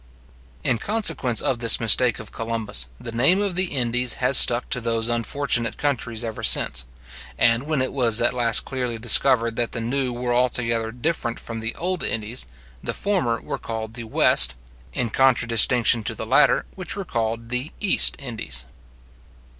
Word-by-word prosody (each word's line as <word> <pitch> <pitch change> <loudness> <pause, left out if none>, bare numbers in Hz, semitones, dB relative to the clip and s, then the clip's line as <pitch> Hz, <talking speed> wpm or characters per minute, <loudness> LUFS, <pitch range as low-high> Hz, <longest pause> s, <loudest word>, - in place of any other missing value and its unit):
In 120 -3 0
consequence 200 - -1
of 125 - -2
this 115 -2 +7
mistake 115 +1 +3
of 110 -3 -11
Columbus, 115 - -1
the 115 - -8
name 140 - +2
of 200 -2 -2
the 185 +2 +2
Indies 125 -5 -1
has 130 +1 +1
stuck 120 -1 +6
to 125 - -2
those 115 0 -2
unfortunate 120 0 -2
countries 120 -5 -3
ever 110 -2 -6
since; 60 0 +1 0.5
and 120 +4 +1
when 150 -4 -1
it 130 - -5
was 120 -4 +3
at 120 +1 +1
last 120 -2 +2
clearly 125 -3 -4
discovered 115 0 +2
that 120 - -2
the - - -4
new 125 +3 -2
were 120 0 -4
altogether 115 -2 -1
different 125 -1 -4
from 115 -1 -7
the 115 +1 -4
old 180 0 -2
Indies, 110 - -2 0.4
the - - -5
former 135 - -2
were - - -6
called 110 -1 -7
the 120 -1 -7
West, 65 - +3 0.4
in 115 - -3
contradistinction 120 -2 +3
to - - -2
the - - -7
latter, - - +3
which 185 0 -6
were 200 -1 -6
called 115 -2 -4
the 125 +5 -3
East 205 -3 +3
Indies. 110 - -5
120 Hz, 170 wpm, -21 LUFS, 115-130 Hz, 0.5 s, this